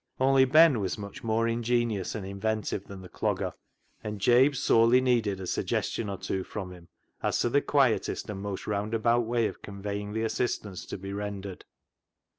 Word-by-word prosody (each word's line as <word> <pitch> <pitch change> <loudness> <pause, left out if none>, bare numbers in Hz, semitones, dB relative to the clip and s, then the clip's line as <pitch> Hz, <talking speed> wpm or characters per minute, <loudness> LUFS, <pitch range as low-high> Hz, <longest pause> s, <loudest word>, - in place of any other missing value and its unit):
Only 135 0 +5
Ben 155 -1 +6
was 95 -2 -2
much 100 -1 -8
more 115 0 +1
ingenious 115 -3 0
and 105 -3 -4
inventive 100 +1 -2
than 95 -1 -10
the - - -9
Clogger, - - -2 0.5
and 105 -1 -5
Jabe 125 +7 +5
sorely 115 -1 +4
needed 115 -6 +1
a 95 - -5
suggestion 105 +4 -2
or 100 - -4
two 95 0 -3
from 95 -2 -6
him 90 -2 -13 0.3
as - - 0
to 120 - +1
the 140 +4 +3
quietest 135 -6 +1
and 100 -3 -5
most 100 -1 -5
roundabout 110 +3 +1
way 115 -1 +1
of - - -4
conveying 100 +1 -5
the 110 +1 -1
assistance 110 -4 -2
to - - -5
be 95 +1 -7
rendered. 100 -2 -5
110 Hz, 175 wpm, -28 LUFS, 100-120 Hz, 0.5 s, Ben